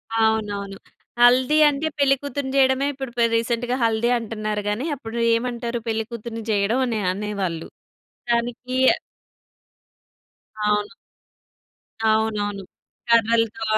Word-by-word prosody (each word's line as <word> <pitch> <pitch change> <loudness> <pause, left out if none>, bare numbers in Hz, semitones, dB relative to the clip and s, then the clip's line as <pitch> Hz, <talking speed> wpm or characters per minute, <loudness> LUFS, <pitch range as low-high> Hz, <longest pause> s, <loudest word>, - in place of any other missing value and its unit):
అవునవును. 210 -3 0 0.4
హల్దీ 255 +5 +5
అంటే 290 +2 -2
పెళ్ళికూతురిని 275 0 0
చేయడమే 265 +1 +3
ఇప్పుడు 265 -2 -6
పె 235 - +3
రీసెంట్‌గా 235 +2 0
హల్దీ 225 +1 +2
అంటున్నారు 215 -2 -3
గాని 220 +7 -2
అప్పుడు 235 -4 -8 0.2
ఏమంటారు 235 0 -3
పెళ్ళికూతురిని 225 0 -4
చేయడం 210 +5 +1
అని 230 -3 -1
అనేవాళ్ళు. 195 -4 -3 0.6
దానికి 240 +2 -1 1.9
అవును. 210 0 +1 1.2
అవునవును. 210 -2 0 0.5
కర్రలతో 230 -1 +2
230 Hz, 90 wpm, -22 LUFS, 215-245 Hz, 1.9 s, హల్దీ